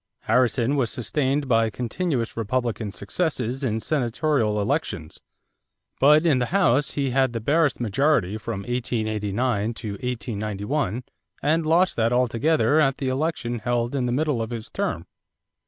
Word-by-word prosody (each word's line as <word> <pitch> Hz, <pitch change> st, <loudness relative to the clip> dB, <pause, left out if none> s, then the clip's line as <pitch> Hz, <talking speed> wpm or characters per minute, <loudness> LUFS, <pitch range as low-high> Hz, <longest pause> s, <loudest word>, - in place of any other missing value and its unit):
Harrison 125 Hz, +3 st, +2 dB
was 125 Hz, -5 st, +1 dB
sustained 135 Hz, +4 st, 0 dB
by 115 Hz, -2 st, +3 dB
continuous 125 Hz, -, -2 dB
Republican 115 Hz, -1 st, -2 dB
successes 130 Hz, -, -2 dB
in 110 Hz, -4 st, 0 dB
Senatorial 120 Hz, -4 st, 0 dB
elections; 100 Hz, -, -2 dB, 0.8 s
but 150 Hz, +4 st, +6 dB
in 145 Hz, -6 st, +4 dB
the 125 Hz, -, 0 dB
House 150 Hz, -7 st, +2 dB
he 140 Hz, -3 st, -1 dB
had 130 Hz, -1 st, +2 dB
the 115 Hz, -, -2 dB
barest 145 Hz, +5 st, +2 dB
majority 120 Hz, -3 st, +1 dB
from 110 Hz, -3 st, -4 dB
1889 110 Hz, -1 st, -1 dB
to 110 Hz, -3 st, -5 dB
1891 110 Hz, +1 st, -3 dB, 0.4 s
and 155 Hz, +2 st, +2 dB
lost 175 Hz, +4 st, +3 dB
that 115 Hz, 0 st, +2 dB
altogether 130 Hz, +5 st, +2 dB
at 135 Hz, -3 st, +2 dB
the 135 Hz, -, -2 dB
election 130 Hz, -4 st, -2 dB
held 120 Hz, +1 st, -1 dB
in 130 Hz, -3 st, 0 dB
the -, -, -1 dB
middle 145 Hz, -2 st, 0 dB
of 110 Hz, -, -3 dB
his 115 Hz, -2 st, -6 dB
term. -, -, -2 dB
125 Hz, 140 wpm, -24 LUFS, 115-145 Hz, 0.8 s, but